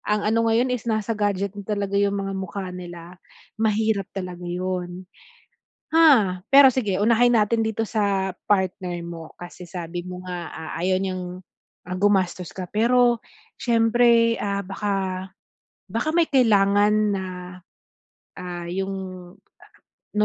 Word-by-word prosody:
ang 210 Hz, 0 st, 0 dB
ano 230 Hz, +1 st, +2 dB
ngayon 245 Hz, +3 st, +2 dB
is 235 Hz, -1 st, -5 dB
nasa 220 Hz, +1 st, 0 dB
gadget 200 Hz, -2 st, -1 dB
na 200 Hz, -, -7 dB
talaga 200 Hz, -1 st, -3 dB
yung 200 Hz, 0 st, +2 dB
mga 195 Hz, 0 st, -3 dB
mukha 190 Hz, 0 st, -5 dB
nila, 175 Hz, -1 st, -9 dB, 0.5 s
mahirap 215 Hz, -2 st, +1 dB
talaga 180 Hz, -2 st, -5 dB
yun. 180 Hz, 0 st, -4 dB, 0.8 s
Ah, 265 Hz, -, +5 dB
pero 275 Hz, -1 st, +9 dB
sige 210 Hz, -7 st, 0 dB
unahin 235 Hz, +3 st, +4 dB
natin 225 Hz, 0 st, +2 dB
dito 220 Hz, 0 st, -2 dB
sa 200 Hz, -3 st, 0 dB, 0.2 s
partner 185 Hz, -3 st, 0 dB
mo, 165 Hz, -2 st, -8 dB
kasi 175 Hz, +1 st, -9 dB
sabi 175 Hz, -1 st, -5 dB
mo 180 Hz, 0 st, -7 dB
nga, 175 Hz, -3 st, -5 dB
ah, 160 Hz, -1 st, -7 dB
ayaw 185 Hz, +1 st, +2 dB
niyang, 185 Hz, -1 st, -4 dB, 0.5 s
ah, 180 Hz, -, -4 dB
gumastos 185 Hz, -3 st, +1 dB
ka 185 Hz, -, -5 dB
pero, 240 Hz, +2 st, +3 dB, 0.4 s
syempre, 230 Hz, 0 st, +4 dB
ah, 200 Hz, -1 st, -1 dB
baka 195 Hz, -2 st, -2 dB, 0.6 s
baka 230 Hz, +9 st, -1 dB
may 335 Hz, -, +4 dB
kailangan 205 Hz, -5 st, +4 dB, 0.2 s
na, 190 Hz, -1 st, -3 dB, 1.2 s
ah, 175 Hz, -1 st, -6 dB
yung 190 Hz, +2 st, -2 dB, 1.3 s
no 210 Hz, -, +5 dB
200 Hz, 135 wpm, -23 LUFS, 185-225 Hz, 1.3 s, pero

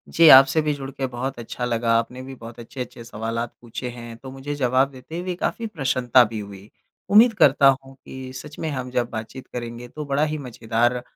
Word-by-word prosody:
जी 165 Hz, 0 st, +7 dB
आपसे 135 Hz, +3 st, +8 dB
भी 150 Hz, -1 st, 0 dB
जुड़ 135 Hz, -1 st, -6 dB
के 135 Hz, 0 st, -3 dB
बहुत 125 Hz, +1 st, -4 dB
अच्छा 120 Hz, +1 st, -5 dB
लगा। 115 Hz, -1 st, +1 dB
आपने 125 Hz, +2 st, -5 dB
भी 135 Hz, 0 st, -9 dB
बहुत 115 Hz, 0 st, -11 dB
अच्छे-अच्छे 120 Hz, 0 st, -8 dB
सवालात 115 Hz, +1 st, -4 dB
पूछे 120 Hz, +1 st, -6 dB
हैं 120 Hz, -1 st, -9 dB
तो 130 Hz, +2 st, -10 dB
मुझे 135 Hz, +2 st, -5 dB
जवाब 130 Hz, 0 st, +2 dB
देते 135 Hz, +6 st, -8 dB
हुए 180 Hz, 0 st, -3 dB
काफ़ी 225 Hz, +5 st, -2 dB
प्रसन्नता 130 Hz, -, +3 dB
भी 110 Hz, -1 st, -4 dB
हुई। 100 Hz, 0 st, -10 dB, 0.4 s
उम्मीद 225 Hz, +3 st, +7 dB
करता 140 Hz, 0 st, +6 dB, 0.2 s
हूँ 135 Hz, 0 st, -15 dB
कि 130 Hz, -1 st, -8 dB
सच 150 Hz, +3 st, -9 dB
में 160 Hz, -, -2 dB
हम 130 Hz, -3 st, -4 dB
जब 120 Hz, -1 st, 0 dB
बातचीत 110 Hz, +4 st, -7 dB
करेंगे 120 Hz, 0 st, -6 dB
तो 150 Hz, +3 st, -7 dB
बड़ा 140 Hz, +2 st, +1 dB
ही 155 Hz, 0 st, -1 dB
मज़ेदार 120 Hz, -1 st, -1 dB
130 Hz, 205 wpm, -23 LUFS, 120-140 Hz, 0.4 s, आपसे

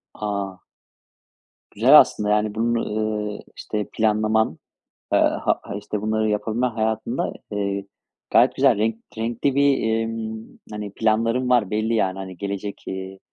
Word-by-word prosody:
A! 100 Hz, -3 st, -3 dB, 1.1 s
Güzel, -, -, +8 dB
aslında, 105 Hz, 0 st, +2 dB
yani 105 Hz, 0 st, +1 dB
bunu, 115 Hz, +1 st, 0 dB
ııı, 105 Hz, -1 st, -2 dB, 0.2 s
işte 105 Hz, -1 st, -4 dB
planlaman, 110 Hz, 0 st, +1 dB, 0.6 s
eee, -, -, +5 dB
ha -, -, +1 dB
ha -, -, -7 dB
işte 105 Hz, 0 st, -4 dB
bunları 110 Hz, 0 st, 0 dB
yapabilmen 110 Hz, +4 st, 0 dB
hayatında, 110 Hz, -1 st, -1 dB, 0.2 s
eee, 100 Hz, -1 st, -2 dB, 0.5 s
gayet -, -, +5 dB
güzel -, -, +4 dB
renk 110 Hz, +1 st, +1 dB, 0.2 s
renkli 120 Hz, +4 st, -1 dB
bir, 135 Hz, -6 st, +2 dB
ımm, 110 Hz, -1 st, -6 dB
hani, 105 Hz, -1 st, -6 dB
planların 115 Hz, +3 st, +1 dB
var 120 Hz, -6 st, +3 dB
belli 110 Hz, +2 st, 0 dB
yani, 95 Hz, -4 st, 0 dB
hani, 95 Hz, -1 st, -7 dB
gelecek, 100 Hz, +1 st, -5 dB
iii, 95 Hz, 0 st, -6 dB
110 Hz, 135 wpm, -23 LUFS, 105-115 Hz, 1.1 s, Güzel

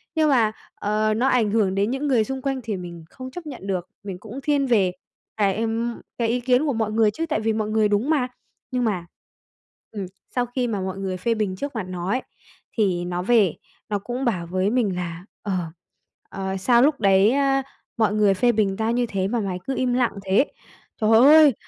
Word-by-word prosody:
nhưng 310 Hz, -1 st, +3 dB
mà, 235 Hz, -6 st, +4 dB, 0.2 s
ờ, 215 Hz, +1 st, 0 dB
nó 240 Hz, +5 st, +1 dB
ảnh 235 Hz, -6 st, +2 dB
hưởng 205 Hz, -4 st, +2 dB
đến 200 Hz, +3 st, +1 dB
những 270 Hz, +3 st, -2 dB
người 250 Hz, -6 st, +3 dB
xung 265 Hz, +3 st, -4 dB
quanh 270 Hz, 0 st, -1 dB
thì 215 Hz, -3 st, -3 dB
mình 175 Hz, -2 st, -8 dB
không 255 Hz, 0 st, -9 dB
chấp 350 Hz, +3 st, -8 dB
nhận 260 Hz, -10 st, -8 dB
được. 185 Hz, -3 st, -2 dB
Mình 195 Hz, -3 st, -6 dB
cũng 220 Hz, +6 st, -8 dB
thiên 285 Hz, -2 st, +2 dB
về 210 Hz, -8 st, +3 dB, 0.5 s
cái, 200 Hz, -3 st, +2 dB
ừm, 230 Hz, +1 st, -2 dB, 0.2 s
cái 235 Hz, -, +1 dB
ý 240 Hz, +2 st, +1 dB
kiến 250 Hz, +4 st, +3 dB
của 285 Hz, -, +1 dB
mọi 220 Hz, -2 st, -1 dB
người 220 Hz, -1 st, +3 dB
chứ, 325 Hz, +10 st, -3 dB
tại 310 Hz, -8 st, -1 dB
vì 220 Hz, 0 st, 0 dB
mọi 215 Hz, -1 st, -1 dB
người 215 Hz, 0 st, +3 dB
đúng 210 Hz, +7 st, 0 dB
mà. 285 Hz, -6 st, +2 dB, 0.4 s
Nhưng 250 Hz, -1 st, 0 dB
mà, 195 Hz, -7 st, -1 dB, 0.9 s
ừm, 205 Hz, -3 st, -4 dB, 0.3 s
sau 245 Hz, -1 st, +2 dB
khi 245 Hz, +1 st, -2 dB
mà 210 Hz, -4 st, -2 dB
mọi 190 Hz, 0 st, -4 dB
người 190 Hz, -1 st, -3 dB
phê 230 Hz, +6 st, 0 dB
bình 210 Hz, -4 st, -1 dB
trước 280 Hz, +7 st, -5 dB
mặt 220 Hz, -, -2 dB
nó 180 Hz, 0 st, -4 dB
ấy, 255 Hz, +5 st, +1 dB, 0.6 s
thì 185 Hz, -5 st, +1 dB
nó 175 Hz, 0 st, -2 dB
về 210 Hz, -3 st, +3 dB, 0.3 s
nó 205 Hz, -1 st, 0 dB
cũng 245 Hz, +6 st, -4 dB
bảo 180 Hz, -8 st, -1 dB
với 185 Hz, +3 st, 0 dB
mình 220 Hz, -5 st, +1 dB
là, 175 Hz, 0 st, -5 dB, 0.2 s
ờ 205 Hz, -, -3 dB, 0.8 s
ờ, 190 Hz, 0 st, -3 dB
"Sao 235 Hz, +5 st, +4 dB
lúc 290 Hz, 0 st, +3 dB
đấy 195 Hz, +2 st, +5 dB
á, 270 Hz, 0 st, +2 dB, 0.3 s
mọi 220 Hz, -2 st, +2 dB
người 210 Hz, -2 st, +4 dB
phê 240 Hz, +5 st, +3 dB
bình 205 Hz, -4 st, 0 dB
tao 225 Hz, +1 st, 0 dB
như 245 Hz, +1 st, +1 dB
thế 195 Hz, -4 st, -1 dB
mà 235 Hz, +3 st, -1 dB
mày 190 Hz, -4 st, -3 dB
cứ 270 Hz, -, -1 dB
im 250 Hz, -1 st, +1 dB
lặng 245 Hz, -1 st, +2 dB
thế?" 195 Hz, +8 st, +4 dB, 0.6 s
Trời 215 Hz, 0 st, +3 dB
ơi! 295 Hz, +2 st, +8 dB
220 Hz, 220 wpm, -23 LUFS, 195-250 Hz, 0.9 s, ơi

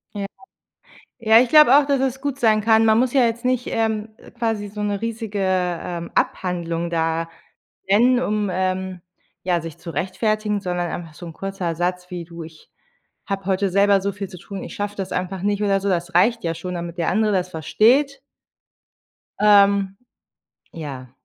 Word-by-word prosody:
Ja. 200 Hz, -1 st, -3 dB, 1.0 s
Ja, 220 Hz, 0 st, +7 dB
ich 250 Hz, -, +2 dB
glaube 300 Hz, -4 st, +8 dB
auch, 290 Hz, -, +3 dB
dass 280 Hz, -2 st, +1 dB
es 265 Hz, 0 st, -1 dB
gut 285 Hz, -2 st, -3 dB
sein 220 Hz, -2 st, +4 dB
kann. 220 Hz, +1 st, +4 dB
Man 220 Hz, 0 st, +4 dB
muss 250 Hz, 0 st, +1 dB
ja 265 Hz, -3 st, +4 dB
jetzt 230 Hz, +1 st, -3 dB
nicht, 255 Hz, -1 st, 0 dB
ähm, 220 Hz, -1 st, -1 dB, 0.3 s
quasi 220 Hz, -3 st, -1 dB
so 210 Hz, +1 st, -6 dB
'ne 205 Hz, -1 st, -1 dB
riesige, 225 Hz, -2 st, -4 dB
ähm, 180 Hz, -2 st, -1 dB
Abhandlung 170 Hz, -2 st, -1 dB
da 165 Hz, 0 st, -1 dB, 0.6 s
nennen, 240 Hz, +5 st, +4 dB
um, 210 Hz, -3 st, -1 dB
ähm, 185 Hz, 0 st, -2 dB, 0.4 s
ja, 175 Hz, -2 st, +1 dB
sich 165 Hz, -2 st, -8 dB
zu 170 Hz, -, -8 dB
rechtfertigen, 210 Hz, -, -1 dB
sondern 180 Hz, -2 st, -2 dB
einfach 165 Hz, -2 st, -6 dB
so 175 Hz, -, -10 dB
'n 165 Hz, -, -8 dB
kurzer 195 Hz, -3 st, -4 dB
Satz 180 Hz, +2 st, -2 dB
wie: 175 Hz, -1 st, -5 dB
„Du, 170 Hz, 0 st, -10 dB
ich 160 Hz, -1 st, -13 dB, 0.6 s
habe 195 Hz, -2 st, -4 dB
heute 195 Hz, 0 st, +1 dB
selber 200 Hz, +1 st, +4 dB
so 200 Hz, +1 st, -1 dB
viel 195 Hz, 0 st, -6 dB
zu 180 Hz, -, -11 dB
tun, 195 Hz, +2 st, -8 dB
ich -, -, -9 dB
schaffe 205 Hz, 0 st, -4 dB
das 195 Hz, -2 st, -5 dB
einfach 185 Hz, +1 st, -3 dB
nicht“ 205 Hz, +1 st, 0 dB
oder 195 Hz, -1 st, +2 dB
so. 200 Hz, -, -2 dB
Das 175 Hz, 0 st, -1 dB
reicht 230 Hz, 0 st, +3 dB
ja 165 Hz, -1 st, -1 dB
schon, 180 Hz, +2 st, -6 dB
damit 170 Hz, 0 st, -6 dB
der 165 Hz, -, 0 dB
andere 215 Hz, +2 st, +2 dB
das 185 Hz, -2 st, 0 dB
versteht. 250 Hz, -, +2 dB, 1.2 s
Ähm, 200 Hz, -2 st, +4 dB, 0.8 s
ja. 135 Hz, -6 st, -7 dB
195 Hz, 180 wpm, -22 LUFS, 175-220 Hz, 1.2 s, glaube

